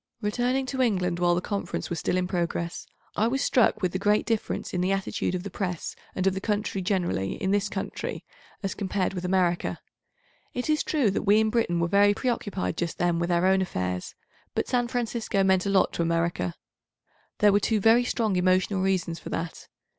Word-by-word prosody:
Returning 245 +5 0
to 260 +1 -2
England 180 -7 +1
while 175 -1 +3
the 175 - 0
Conference 200 -1 -4
was 170 - -1
still 180 - 0
in 180 - +1
progress, 170 -1 -2 0.3
I 220 - +2
was 270 +3 0
struck 220 -4 +3
with 180 - +2
the 185 - -2
great 210 +1 +2
difference 225 -2 -2
in 180 - 0
the 185 +2 +1
attitude 195 -1 -1
of 180 - -3
the 200 - -6
Press 180 -3 -3 0.2
and 185 - -1
of 195 - +3
the 190 - -4
country 205 -2 -1
generally 180 - 0
in 190 - -2
this 205 0 +1
country 195 -1 -5 0.4
as 195 - -1
compared 195 -1 -1
with 180 -1 -4
America. 180 -2 +1 0.8
It 250 +5 0
is 305 - +2
true 275 - +1
that - - -1
we 210 +1 +4
in 220 0 +2
Britain 215 -8 +1
were 170 - +1
very 205 +3 +4
preoccupied 205 - -2
just 170 -1 -2
then 175 -1 +1
without 170 0 +1
own 190 +1 +4
affairs, 90 - -3 0.4
but - - 0
San 245 -1 +1
Francisco 235 -4 -1
meant 190 0 +3
a - - +1
lot 195 -1 +3
to - - -2
America. 165 - 0 0.8
There 205 -1 +5
were 205 - +5
two 215 +1 +1
very 225 +4 +5
strong 225 -5 0
emotional 185 +2 +2
reasons 185 -3 0
for - - -8
that. 165 0 -5
190 Hz, 200 wpm, -26 LUFS, 175-215 Hz, 0.8 s, There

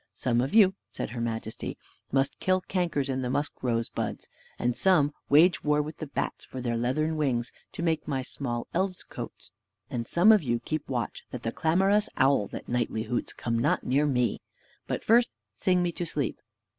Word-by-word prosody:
"Some 120 -1 +1
of 135 - -2
you," 195 -4 +7 0.2
said - - -5
her 120 0 -4
majesty, 115 -1 -4 0.3
"must 135 +1 +1
kill 185 0 +2
cankers 175 -7 -1
in 130 -1 -1
the 125 - -2
musk 145 +3 -2
rose 115 -2 0
buds, - - -4 0.3
and 120 0 0
some 155 -6 +4 0.2
wage 165 +5 +5
war 150 0 +3
with 150 +1 -3
the 155 - -5
bats - - -3
for 130 - -8
their 120 -2 -1
leathern 155 +7 0
wings, 125 -5 0 0.2
to 170 - -4
make 165 -3 0
my 135 -3 -1
small 120 -3 -3
elves 185 +1 -1
coats; - - -8 0.4
and 115 -2 -3
some 180 +6 +6
of 215 -3 +6
you 120 -5 0
keep 155 +5 -4
watch 125 -3 -3
that 125 - -7
the 115 - -1
clamorous 195 - +2
owl, 130 -6 +4
that - - -8
nightly 120 -2 -1
hoots, 120 +2 -2
come 115 -1 -2
not 140 +6 +1
near 140 +4 +2
me: 125 -6 +1 0.5
but - - -2
first 235 +2 +5 0.2
sing 180 - +2
me 175 - 0
to 175 - -4
sleep. 145 -6 -1
140 Hz, 195 wpm, -28 LUFS, 120-170 Hz, 0.5 s, you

